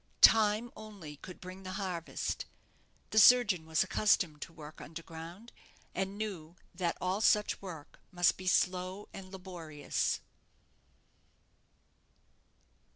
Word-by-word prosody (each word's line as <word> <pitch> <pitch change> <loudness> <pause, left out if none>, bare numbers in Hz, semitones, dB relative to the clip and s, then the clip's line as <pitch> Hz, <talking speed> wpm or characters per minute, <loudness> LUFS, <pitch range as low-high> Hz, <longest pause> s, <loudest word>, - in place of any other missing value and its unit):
Time 220 +1 +6
only 200 -9 -10
could 180 +4 -11
bring 185 +1 -9
the 185 -1 -6
harvest. 185 -4 -3 0.7
The 220 - +5
surgeon 210 -7 +6
was 160 +2 +3
accustomed 185 -6 +2
to - - -6
work 155 -2 -11
underground, 165 +6 -9 0.4
and 190 +2 -2
knew 180 -7 -5 0.2
that 175 -1 -1
all 185 +3 -1
such 210 -2 +3
work 165 -6 -9
must 175 -1 +3
be 185 - -8
slow 185 +2 +1
and 185 -1 -9
laborious. 175 -6 -3
185 Hz, 110 wpm, -32 LUFS, 165-205 Hz, 0.7 s, Time